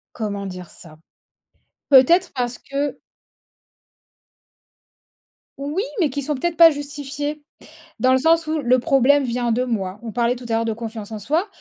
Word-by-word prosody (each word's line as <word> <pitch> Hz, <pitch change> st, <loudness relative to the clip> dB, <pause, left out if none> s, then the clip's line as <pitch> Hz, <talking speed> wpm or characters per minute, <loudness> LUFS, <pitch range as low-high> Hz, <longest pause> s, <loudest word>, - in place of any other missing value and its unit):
Comment 205 Hz, -3 st, -4 dB
dire 180 Hz, -2 st, -8 dB
ça? 155 Hz, -3 st, -13 dB, 0.9 s
Peut-être 295 Hz, +7 st, +5 dB
parce 245 Hz, -2 st, -2 dB
que 280 Hz, 0 st, -4 dB, 2.6 s
Oui, 290 Hz, +8 st, -2 dB, 0.2 s
mais 320 Hz, -, +2 dB
qui 285 Hz, +2 st, -4 dB
sont 295 Hz, +2 st, -2 dB
peut-être 335 Hz, +5 st, -2 dB
pas 330 Hz, -1 st, +9 dB
justifiés. 290 Hz, 0 st, -5 dB, 0.6 s
Dans 255 Hz, 0 st, +4 dB
le 260 Hz, -, +5 dB
sens 325 Hz, +3 st, +2 dB
où, 310 Hz, 0 st, -1 dB
le 255 Hz, -2 st, +3 dB
problème 275 Hz, +3 st, +3 dB
vient 240 Hz, -1 st, -1 dB
de 245 Hz, +3 st, +1 dB
moi. 205 Hz, -5 st, -3 dB
On 225 Hz, -, -6 dB
parlait 240 Hz, +1 st, +1 dB
tout 250 Hz, 0 st, -11 dB
à -, -, -1 dB
l'heure 225 Hz, 0 st, +1 dB
de 225 Hz, -, -1 dB
confiance 225 Hz, -1 st, -7 dB
en 215 Hz, -, -5 dB
soi. 310 Hz, -, 0 dB
255 Hz, 160 wpm, -21 LUFS, 230-290 Hz, 2.6 s, pas